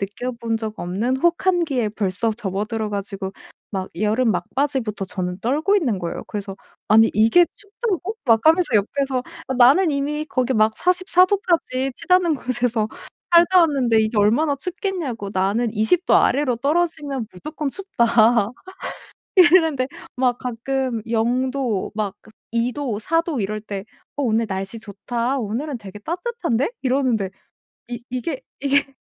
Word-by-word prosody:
느껴본 230 +3 -3
적 220 -1 -6
없는 215 +9 -1
혹한기에 335 - +1
벌써 205 +1 -1
접어들어 215 +1 -3
가지고 195 -1 -4 0.4
막 190 -2 -4
여름 220 +4 +2
막바지부터 225 +2 -2
저는 180 -1 -4
떨고 300 - +2
있는 250 - 0
거예요. 170 -2 -5
그래서 200 -2 -6 0.3
"아니 225 +1 +6
이게 230 +12 +5
춥다고?" 415 -1 -4
막 225 -1 +4
하면서 330 +2 +5
옆에서 260 +5 +1 0.3
"아 265 - -1
나는 275 +9 +5
이미 295 +2 -1
거기 260 -2 0
막 215 0 +3
44 365 0 +4
도까지 330 -9 0
치닫는 360 -3 +2
곳에서 240 -4 0 0.5
살다 345 +2 +7
왔는데 265 -8 +3
이게 220 +1 -1
얼마나 265 +9 +3
춥겠냐고 305 - -4
나는 210 +5 0
20 220 - +2
도 - - +5
아래로 265 -4 +2
떨어지면 290 -2 -1
무조건 300 - -5
춥다." 235 - +2 0.9
이랬는데 325 -7 +5 0.3
막 250 -1 +2
가끔 250 0 -2
0 240 +3 +1
도 250 -8 -2
막 205 -3 -2
그 220 - -17 0.3
2 235 +2 +1
도, 255 -7 -3
4 330 +9 +1
도 315 -9 -3
이럴 215 +2 -2
때 200 -2 -6 0.3
"어 285 - -2
오늘 230 -2 +1
날씨 195 +3 -4
좋다 235 +5 -3
오늘은 245 +6 -3
되게 205 -1 -10
따뜻한데?" 340 - -2
이러는데 250 -7 +1 0.6
이 240 -1 -6
이게 255 - -3 0.2
이게 280 0 +2
245 Hz, 290 characters per minute, -21 LUFS, 215-300 Hz, 0.9 s, 살다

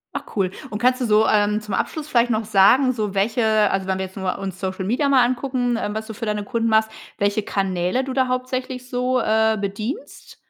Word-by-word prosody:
Ach, - - -4
cool. 190 -3 +1 0.2
Und 210 - -4
kannst 250 +2 +2
du - - +1
so, 215 0 +4
ähm, 210 0 +2
zum 215 -2 -7
Abschluss 310 -2 -2
vielleicht 240 -4 +2
noch 220 -1 0
sagen, 220 +6 +4
so 210 -4 -3
welche 220 +5 +1 0.3
also, 190 -1 -1
wenn 190 0 0
wir 190 - -2
jetzt 190 - -13
nur 190 -2 -2
uns 190 -1 -6
Social 190 0 -3
Media 265 +7 +1
mal 260 -3 +5
angucken, 250 -1 -1
ähm, 205 0 -3
was 220 0 -3
du 220 - -7
für 230 +1 -6
deine 210 -1 -1
Kunden 230 0 -1
machst, 220 0 +3 0.3
welche 205 +1 +1
Kanäle 190 +3 -1
du 265 0 -5
da 260 -1 +2
hauptsächlich 255 0 -3
so, 250 0 0
äh, 220 0 +2
bedienst? 215 - -6
220 Hz, 225 wpm, -22 LUFS, 200-255 Hz, 0.3 s, mal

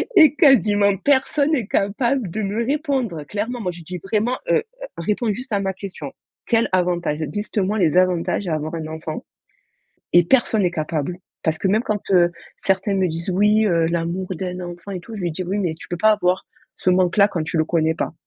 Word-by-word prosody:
et 310 -5 +7
quasiment 210 - +4
personne 285 - +2
est 245 -7 -1
capable 235 +3 0
de 215 +6 -3
me 205 +4 -1
répondre, 265 - -1
clairement. 215 - -4
Moi 180 -3 -2
je 170 - -11
dis: 180 +3 -6
«Vraiment, 220 +5 0
heu, - - +3 0.3
réponds 210 +5 0
juste 255 +4 -8
à 200 - +2
ma 190 -1 -1
question, 180 -7 -8 0.3
quel 230 0 +2
avantage, 175 -4 +1 0.2
liste 210 +1 -5
moi 205 +3 0
les 170 -2 +3
avantages 180 +1 +1
à 165 - 0
avoir 155 +2 -4
un 160 -1 -4
enfant». 160 0 -6 0.9
Et 175 0 +7
personne 225 0 +2
est 175 - +1
capable, 155 +1 -3 0.3
parce 160 -1 0
que 190 - -1
même 215 +5 +2
quand, 210 -2 -3
heu, 175 -2 +5 0.3
certains 195 +1 +1
me 190 -1 +2
disent: 165 +3 -4
«Oui, 210 +3 +3
heu, 170 -4 +2
l'amour 170 +2 -2
d'un 180 +1 -4
enfant 175 +2 -8
et 185 - -4
tout». 225 - -11
Je 205 - -6
lui 175 - 0
dis 185 +4 -4
oui: 190 +3 -2
«Mais 175 -5 -1
tu 160 - -12
peux 175 - -3
pas 215 +4 +5
avoir 185 -3 0 0.3
ce - - 0
manque-là 185 +2 +4
quand 170 -6 -3
tu 155 +2 -2
le 155 - +2
connais 160 -1 +1
pas, - - -3
190 Hz, 210 wpm, -21 LUFS, 170-215 Hz, 0.9 s, et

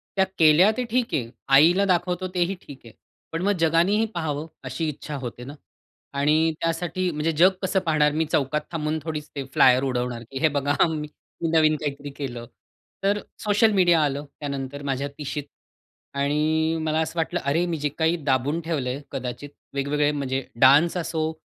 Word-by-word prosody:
त्या 190 - +3
केल्या 160 +6 +6
ते 250 - 0
ठीक 245 0 0
आहे. 120 -4 -1 0.2
आईला 165 +8 +5
दाखवतो 180 0 0
तेही 180 +1 0
ठीक 140 -2 -12
आहे. 115 - -13 0.4
पण 165 - -3
मग 200 +2 +2
जगानेही 170 +7 +3
पाहावं 160 -2 -3 0.2
अशी 130 +5 -3
इच्छा 150 0 -6
होते 125 -2 -7
ना 140 +3 -8 0.7
आणि 155 +3 +3
त्यासाठी 170 +2 -1
म्हणजे 150 +1 -1
जग 180 +3 +7
कसं 190 0 +1
पाहणार, 150 -2 +3
मी 160 +2 0
चौकात 150 +1 +1
थांबून 155 -1 -2
थोडीच 155 -2 -5 0.2
फ्लायर 130 0 +5
उडवणार, 125 -2 -2
की 135 - -4
हे 160 - +4
बघा 145 +1 0
मी 155 -1 -3 0.5
नवीन 155 -1 +4
काहीतरी 145 -1 -5
केलं. 120 -4 -5 0.6
तर 200 +1 +2 0.2
सोशल 210 +1 +3
मीडिया 175 -4 +4
आलं, 145 0 -2
त्यानंतर 140 -1 -5
माझ्या 140 0 -2
30शीत 145 0 -4 0.7
आणि 155 +3 +1
मला 155 0 0
असं 160 - -4
वाटलं, 175 +2 -1
अरे 155 +6 +1
मी 170 -2 -2
जे 145 0 -1
काही 165 +1 +2
दाबून 140 +3 +1
ठेवलंय 140 -6 -2
कदाचित, 125 +3 -5 0.2
वेगवेगळे 145 +1 +1
म्हणजे 135 -2 -2 0.2
डान्स 145 +7 +6
असो 160 -2 -1
155 Hz, 165 wpm, -24 LUFS, 140-170 Hz, 0.7 s, जग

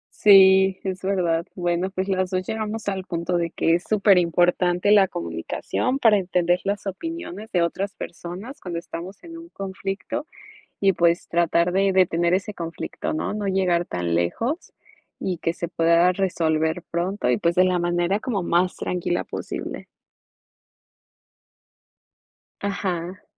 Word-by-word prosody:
Sí, 190 -1 +6
es 190 -1 -4
verdad. 175 -4 0
Bueno, 175 0 -1
pues 190 0 -3
las 185 -1 0
2 185 0 -2
llegamos 220 0 -4
al 195 -2 -2
punto 170 0 -2
de 170 -1 -1
que 165 - +1
es 175 +1 +1
superimportante 180 -2 +3
la 200 -2 +6
comunicación 85 - -3
para 225 -6 +5
entender 180 -1 +1
las 200 +1 -2
opiniones 220 - -6
de 175 -2 +2
otras 195 +4 -2
personas 185 - -8
cuando 175 -2 -5
estamos 170 +3 -7
en 330 -1 -9
un 335 0 -12
conflicto, 195 - -5 0.5
y 195 -1 +4
pues, 170 0 +2
tratar 170 0 +2
de 195 +1 +2
detener 175 -2 +3
ese 195 +3 -1
conflicto, 165 -1 -5
¿no?, 155 - -2
no 210 -1 -3
llegar 185 -3 +1
tan 85 - -2
lejos 230 - -2 0.5
y 185 -2 -2
que 165 0 -1
se 170 - -4
pueda 170 +1 +3
resolver 165 -3 0
pronto, 175 -3 -1
y 125 - +3
pues 170 +9 +1
de 185 - +5
la 185 -1 +2
manera 175 +3 +1
como 220 -4 -2
más 175 +2 +1
tranquila 175 -1 -2
posible. - - -6 2.8
Ajá. 185 -2 -3
185 Hz, 145 wpm, -23 LUFS, 170-195 Hz, 2.8 s, Sí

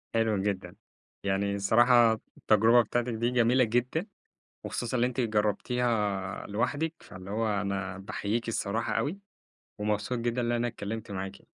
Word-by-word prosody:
حلو 110 -2 +2
جدًا. 100 -2 -3 0.5
يعني 100 +1 0
الصراحة 120 +3 +5 0.2
التجربة 115 +3 +5
بتاعتِك 120 +2 -1
دي 120 +2 0
جميلة 125 +1 +4
جدًا، 125 - 0 0.6
وخصوصًا 120 +1 -2
اللي 120 +1 +3
أنتِ 125 +1 -2
جربتيها 105 -2 0
لوحدِك، 145 +10 -1
فاللي 95 +1 -11
هو 110 +2 0
أنا 95 -2 -3
باحييكِ 105 +4 -3
الصراحة 115 +1 -1
أوي، 165 +8 -1 0.6
ومبسوط 105 +3 -1
جدًا 120 +1 -1
إن 120 0 0
أنا 120 0 +1
اتكلمت 110 -1 -6
معاكِ. 95 0 -5
115 Hz, 135 wpm, -29 LUFS, 100-120 Hz, 0.6 s, الصراحة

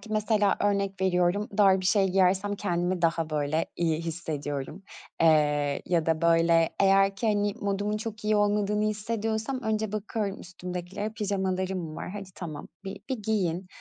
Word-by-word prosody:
ki, - - -13
mesela, 215 -1 +2
örnek 200 -1 0
veriyorum, 185 +2 +1
dar 195 -2 +5
bir 185 - -2
şey 195 0 +3
giyersem 190 +2 +2
kendimi 175 -2 -1
daha 165 -1 +1
böyle 150 +1 0
iyi 165 -2 +1
hissediyorum. 155 0 -4 0.4
Eee, 150 -3 +3
ya 170 -3 +1
da 160 0 +1
böyle, 165 0 +4
eğer 195 0 +4
ki 225 - -2
hani, 205 -1 +1
modumun 205 +1 -1
çok 215 -1 -6
iyi 215 0 +3
olmadığını 210 0 +1
hissediyorsam 220 +3 -2
önce 220 -1 -1
bakıyorum 210 -1 -3
üstümdekilere, 180 +3 -5
pijamalarım 190 -5 -2
var, - - -5
hadi 200 -1 -7
tamam, 155 -5 -7 0.2
bir 195 - -6
bir 260 -4 -2
giyin, 190 -4 -1
195 Hz, 150 wpm, -27 LUFS, 170-205 Hz, 0.4 s, dar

